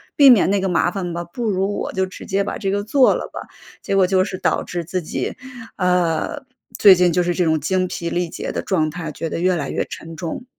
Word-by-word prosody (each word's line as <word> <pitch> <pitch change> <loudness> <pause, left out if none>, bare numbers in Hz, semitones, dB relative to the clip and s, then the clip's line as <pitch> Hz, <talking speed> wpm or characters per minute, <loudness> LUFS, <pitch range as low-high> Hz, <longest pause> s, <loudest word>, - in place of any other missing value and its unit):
避 280 -2 +8
免 225 -7 +6
那 200 - +2
个 190 - 0
麻 175 0 +2
烦 180 -3 -4
吧， 170 0 -3
不 220 +7 -4
如 195 +1 -1
我 - - -3
就 190 0 0
直 185 - -10
接 195 +1 0
把 - - -4
这 195 - -2
个 205 +1 -1
做 255 +5 +4
了 - - -4
吧。 - - -6 0.4
结 195 - -2
果 195 -1 +5
就 185 0 +2
是 190 -1 -5
导 - - 0
致 175 -1 -4
自 180 +2 -2
己， 155 - -4 0.4
呃， 180 - 0 0.3
最 200 -2 +8
近 180 -1 +3
就 180 +2 +2
是 175 0 0
这 180 - 0
种 160 -1 +2
精 185 +5 0
疲 170 -1 -4
力 175 0 -1
竭 - - -5
的 - - -3
状 160 -6 0
态， 165 -1 -6
觉 165 +2 -5
得 - - -3
越 180 +1 +2
来 145 -5 -3
越 - - -1
沉 165 0 -9
重。 165 +9 -5
180 Hz, 270 characters per minute, -20 LUFS, 170-195 Hz, 0.4 s, 避